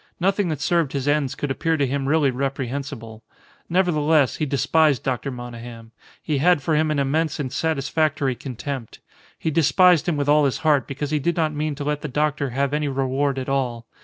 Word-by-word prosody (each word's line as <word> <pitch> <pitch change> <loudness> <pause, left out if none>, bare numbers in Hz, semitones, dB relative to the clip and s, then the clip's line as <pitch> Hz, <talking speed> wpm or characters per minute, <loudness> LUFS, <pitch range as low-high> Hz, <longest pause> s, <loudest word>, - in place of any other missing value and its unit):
Nothing 195 +1 +1
that 150 -3 -3
served 165 -3 +1
his 140 -1 -2
ends 145 -3 +1
could 145 - -3
appear 165 +4 0
to 140 - +2
him 135 +1 -2
really 150 -3 +3
reprehensible. 130 -4 -4 0.5
Nevertheless, 160 -6 +2
he 155 - -1
despised 140 +2 +2
Dr. 130 +1 -2
Monygham. 120 -2 -9 0.3
He 150 -3 -1
had 170 -1 +3
for 160 - +1
him 155 +1 +2
an 150 - 0
immense 155 +3 0
and 130 -4 -3
satisfactory 150 -2 0
contempt. 130 0 -6 0.4
He 160 - -2
despised 175 +2 +4
him 160 - 0
with 145 -1 -1
all 150 0 +5
his 135 - 0
heart 150 -3 +3
because 145 +1 -4
he 155 - +1
did 170 +4 0
not 155 -2 +1
mean 150 0 -2
to 145 - -5
let 150 0 -2
the - - -4
doctor 150 0 -1
have 140 +3 -1
any 150 0 0
reward 135 0 0
at 130 - -4
all. 125 -4 -1
145 Hz, 195 wpm, -22 LUFS, 135-155 Hz, 0.5 s, all